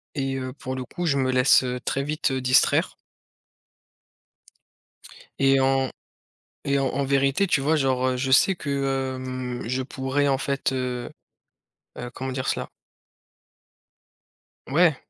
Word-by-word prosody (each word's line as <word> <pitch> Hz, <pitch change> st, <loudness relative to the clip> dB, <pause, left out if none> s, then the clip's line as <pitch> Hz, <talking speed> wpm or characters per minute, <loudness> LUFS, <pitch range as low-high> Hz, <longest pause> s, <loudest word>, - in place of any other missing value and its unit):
et 135 Hz, -2 st, -1 dB
heu, 130 Hz, -1 st, -5 dB
pour 130 Hz, -2 st, -6 dB
le 130 Hz, -1 st, -5 dB
coup, 175 Hz, +8 st, -5 dB
je 140 Hz, -4 st, +2 dB
me 130 Hz, -1 st, +1 dB
laisse, 130 Hz, +1 st, +5 dB
heu, 125 Hz, 0 st, -3 dB
très 140 Hz, -, -1 dB
vite 150 Hz, 0 st, -1 dB
distraire 130 Hz, -1 st, +3 dB, 2.4 s
et 135 Hz, 0 st, +4 dB
en 135 Hz, 0 st, +2 dB, 0.8 s
et 140 Hz, 0 st, +1 dB
en 135 Hz, -, +1 dB
en 140 Hz, +1 st, -1 dB
vérité, 140 Hz, +7 st, +2 dB
tu 150 Hz, -, +2 dB
vois, 150 Hz, +4 st, +2 dB
genre, 130 Hz, -3 st, +1 dB
heu, 130 Hz, -, -1 dB
je 130 Hz, +1 st, -2 dB
sais 190 Hz, +8 st, +5 dB
que, 135 Hz, -4 st, -2 dB
hem, 130 Hz, -1 st, -5 dB
je 130 Hz, +2 st, -1 dB
pourrais, 135 Hz, +2 st, -1 dB
en 135 Hz, -, +2 dB
fait, 140 Hz, -1 st, -1 dB
heu 125 Hz, -2 st, -3 dB, 0.9 s
heu, 125 Hz, 0 st, -5 dB
comment 130 Hz, 0 st, -5 dB
dire 130 Hz, 0 st, -3 dB
cela? -, -, -1 dB, 2.0 s
Ouais, 155 Hz, +2 st, +4 dB
135 Hz, 145 wpm, -24 LUFS, 130-140 Hz, 2.4 s, laisse